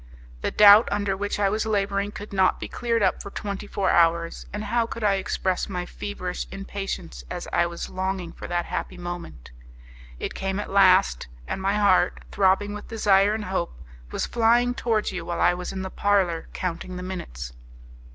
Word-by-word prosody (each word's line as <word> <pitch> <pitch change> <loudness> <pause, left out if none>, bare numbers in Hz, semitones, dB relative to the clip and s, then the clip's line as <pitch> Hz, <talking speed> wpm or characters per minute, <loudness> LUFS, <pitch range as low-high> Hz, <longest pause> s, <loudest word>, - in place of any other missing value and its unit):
The - - 0
doubt 210 +2 +8
under 200 -1 0
which 205 +1 -3
I 200 - +3
was 215 +2 0
labouring 200 -1 0
could 205 0 -9
not 190 -1 +3
be - - -5
cleared 230 -3 0
up - - +2
for - - -7
twenty 200 0 -5
four 200 -1 0
hours, 170 0 +2
and 210 +1 -4
how 230 +2 +1
could 230 -1 -6
I 205 -1 +4
express 185 -1 -1
my 180 -2 -3
feverish 185 -1 -5
impatience 195 - -5
as - - -5
I 175 0 +3
was 170 0 -6
longing 185 -2 -3
for - - -8
that 175 0 -1
happy - - -4
moment! 175 - -7 0.7
It - - -4
came 195 +1 -2
at 205 - -5
last! 195 - +4 0.2
and - - -3
my 195 +2 +1
heart, 195 -3 +3
throbbing 200 +1 +2
with 210 - -8
desire 205 -2 +3
and 215 -1 -4
hope, 125 - -3 0.3
was - - -2
flying 240 +1 +3
towards 225 -3 0
you 185 - -4
while 170 - -4
I - - +4
was 180 0 -5
in 190 -1 -4
the 190 - -5
parlour 190 -5 +1
counting 180 0 -4
the 180 - -5
minutes! 65 - -6
195 Hz, 190 wpm, -25 LUFS, 180-205 Hz, 0.7 s, doubt